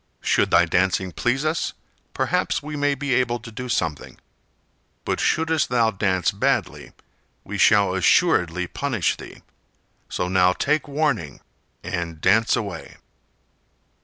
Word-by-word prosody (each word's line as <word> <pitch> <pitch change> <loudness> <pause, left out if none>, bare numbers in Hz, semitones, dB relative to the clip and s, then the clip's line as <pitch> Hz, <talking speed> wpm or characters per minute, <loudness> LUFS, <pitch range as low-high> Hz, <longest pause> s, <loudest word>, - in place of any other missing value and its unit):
Should - - +2
thy - - +5
dancing 95 0 0
please 130 - -1
us, 155 +1 -1 0.4
perhaps - - 0
we 150 +1 -6
may 145 -1 +1
be 140 -1 -2
able 125 -1 +1
to 115 0 -11
do 125 +3 -7
something; 80 - -2 0.9
but - - -1
shouldst 160 0 +1
thou 115 -2 +2
dance 95 -3 0
badly - - -2 0.5
we - - -6
shall 100 -2 +4
assuredly 90 -1 +2
punish 120 -2 -1
thee, - - -12 0.7
so 90 - -2
now 90 0 +3
take 150 +9 0
warning 140 - -1 0.4
and 85 -3 -4
dance 110 +7 +3
away." 100 -6 -6
110 Hz, 130 wpm, -22 LUFS, 90-140 Hz, 0.9 s, thy